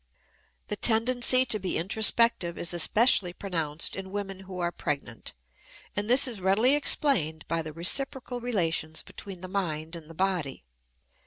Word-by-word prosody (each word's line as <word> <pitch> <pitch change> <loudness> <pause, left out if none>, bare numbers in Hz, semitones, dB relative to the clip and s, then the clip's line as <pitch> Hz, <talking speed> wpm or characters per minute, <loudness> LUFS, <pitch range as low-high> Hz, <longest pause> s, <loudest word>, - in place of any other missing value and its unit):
The 210 - -2
tendency 245 +4 +4
to 215 - +1
be 185 -1 -2
introspective 210 0 +1
is 170 - -1
especially 185 +1 +3
pronounced 165 -6 -2
in 190 0 -7
women 195 -1 -5
who 190 -1 -10
are 175 -1 -1
pregnant, 140 -8 -5 0.6
and 205 +2 -2
this 265 +3 +6
is 225 -6 -3
readily 205 +8 +3
explained 205 - +1
by 165 0 -1
the 155 -1 -7
reciprocal 245 - -1
relations 165 -9 -2
between 195 -3 -10
the 185 - -7
mind 165 -4 -3
and 165 -2 -11
the 165 - -12
body. 180 - -2
190 Hz, 150 wpm, -27 LUFS, 165-225 Hz, 0.6 s, this